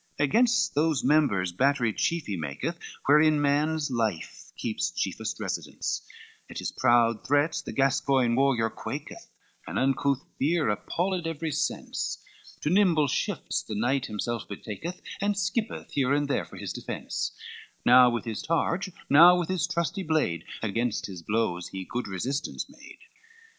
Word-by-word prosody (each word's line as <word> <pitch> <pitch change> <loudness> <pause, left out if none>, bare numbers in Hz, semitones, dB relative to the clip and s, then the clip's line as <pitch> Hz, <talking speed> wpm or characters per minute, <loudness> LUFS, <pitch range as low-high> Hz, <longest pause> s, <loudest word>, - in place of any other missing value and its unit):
XXXIX - - +3
Against 235 - +3
those 155 -1 +1
members 130 - +3
battery 125 +2 +2
chief 170 +7 0
he 100 - -3
maketh, 75 -5 -4 0.3
Wherein 150 +2 +5
man's 145 +1 +1
life 110 -8 -3
keeps - - -1
chiefest - - -3
residence; - - -3 0.5
At - - -8
his - - -3
proud 120 -3 +3
threats 145 +3 +1
the - - -7
Gascoign 135 -2 +2
warrior 125 -4 +2
quaketh, - - -7 0.4
And - - -4
uncouth 135 0 +1
fear 155 -1 +2
appalled 175 - -1
every 165 0 -3
sense, 150 - -2 0.4
To 150 - 0
nimble 175 -7 +4
shifts - - -1
the 105 - -6
knight 125 +5 0
himself 110 +2 -3
betaketh, 110 - -6 0.2
And 205 0 +1
skippeth 215 +4 -2
here 135 -1 +1
and 145 0 0
there 140 - 0
for - - -13
his - - -5
defence: - - -4 0.5
Now 125 0 +8
with 120 -2 -2
his 110 -3 -4
rage, 170 +3 +1 0.2
now 170 +5 +8
with 175 -1 -2
his 185 -2 0
trusty 175 +2 -1
blade, 155 - 0 0.2
Against 115 +2 -1
his 95 -3 -7
blows 90 -2 -1
he 95 -1 -6
good 125 +5 -4
resistance 130 +10 -3
made. 295 +2 -14
140 Hz, 150 wpm, -27 LUFS, 115-160 Hz, 0.5 s, Now